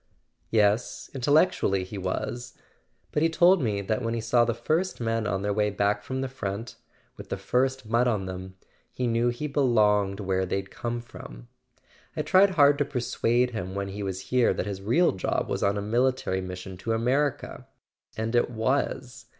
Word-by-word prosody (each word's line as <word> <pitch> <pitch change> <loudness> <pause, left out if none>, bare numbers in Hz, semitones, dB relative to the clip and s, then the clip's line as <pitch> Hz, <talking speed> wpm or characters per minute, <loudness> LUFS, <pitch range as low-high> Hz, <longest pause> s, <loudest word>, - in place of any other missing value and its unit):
"Yes; 105 +1 +1
intellectually 140 - +2
he 95 +2 -7
was. 120 +7 -4 0.5
But 150 - 0
he 165 - +4
told 175 +2 +5
me 105 -5 0
that 110 +4 -1
when 115 -1 -1
he - - -1
saw 120 +1 +3
the 115 -1 -1
first 160 +10 -1
men 115 -2 -1
on 95 +1 -1
their 105 0 0
way 105 0 +1
back 100 +1 0
from 130 +4 -4
the 135 - -1
front—with 115 -3 -8
the - - -2
first 130 +1 0
mud 115 +3 +2
on 105 -5 0
them—he 95 +6 -8
knew 120 0 +2
he 120 +5 -3
be¬ 140 - -9
longed 105 -5 +3
where 95 -2 0
they'd 95 +1 -3
come 120 -1 -4
from. - - -12 0.7
I - - 0
tried 190 +3 +5
hard 145 -1 +6
to 145 - +2
per¬ 140 -2 -5
suade 120 +1 +1
him 95 -5 -5
when 100 0 -3
he 100 +1 -6
was 95 -1 -3
here 125 -2 +3
that - - -2
his 100 -2 -5
real 140 - +3
job 95 - -2
was - - -2
on 100 +1 +1
a 100 - -2
military 120 -3 0
mission 90 0 -7
to 115 +5 -2
America—and 120 -2 -3
it 120 - +3
was. 125 +1 -2
115 Hz, 180 wpm, -26 LUFS, 100-130 Hz, 0.7 s, hard